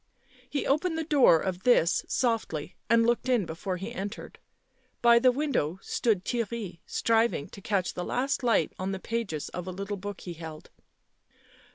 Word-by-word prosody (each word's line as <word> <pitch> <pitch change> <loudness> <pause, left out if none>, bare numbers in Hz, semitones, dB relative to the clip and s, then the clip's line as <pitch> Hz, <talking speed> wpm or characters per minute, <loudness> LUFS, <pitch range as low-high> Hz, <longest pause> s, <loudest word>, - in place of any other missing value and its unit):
He 285 - -2
opened 320 +4 +1
the 320 - -1
door 280 - +5
of 185 +1 -3
this 185 -8 +4
softly 220 - -1
and 230 0 +5
looked 240 +2 +1
in 240 -6 +3
before 180 +3 -4
he 200 +6 -6
entered. 200 +3 -6 0.6
By 235 0 +7
the 255 +1 +5
window 250 - -1
stood 210 -6 0
Theirry 230 -7 -3
striving 225 -9 +1
to 200 - -11
catch 195 -3 0
the 180 - -4
last 265 +9 -1
light 235 -4 +2
on 190 +1 -2
the 190 - -4
pages 210 -9 -3
of 180 0 -6
a - - -3
little 200 +2 -4
book 205 +1 -6
he 175 - -6
held. 160 -2 -9
205 Hz, 170 wpm, -28 LUFS, 180-240 Hz, 0.6 s, By